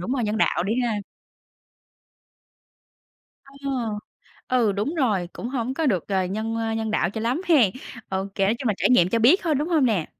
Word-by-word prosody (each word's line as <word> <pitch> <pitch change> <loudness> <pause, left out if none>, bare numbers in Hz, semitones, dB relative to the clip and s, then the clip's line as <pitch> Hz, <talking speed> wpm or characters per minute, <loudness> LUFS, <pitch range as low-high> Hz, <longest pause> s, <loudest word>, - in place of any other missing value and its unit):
đúng 230 +9 -3
rồi 250 -4 0
nhân 210 +1 -1
đạo 175 - +2
đi 205 - 0
ha. 225 -3 0 2.5
Ờ, - - -22 1.0
ừ, 240 -5 +2
đúng 210 - -2
rồi, 210 - 0
cũng 235 - -6
hổng 255 0 -2
có 320 - -1
được, 190 - 0
ờ, 190 -2 +1
nhân, 220 +4 -3
a, 225 0 -1
nhân 220 -1 -2
đạo 185 -4 +1
cho 220 - -5
lắm 240 +8 0
hén. 255 - +5 0.4
Ô 190 0 -2
kê, 195 - +1
nói 210 - +2
chung 255 -3 -2
là, 210 - +1
trải - - +1
nghiệm 180 -9 +5
cho 230 - +1
biết 265 - +5
thôi, 325 -3 +1
đúng 295 +4 -1
hông 315 -6 +3
nè? 200 -9 0
225 Hz, 205 wpm, -24 LUFS, 200-255 Hz, 2.5 s, hén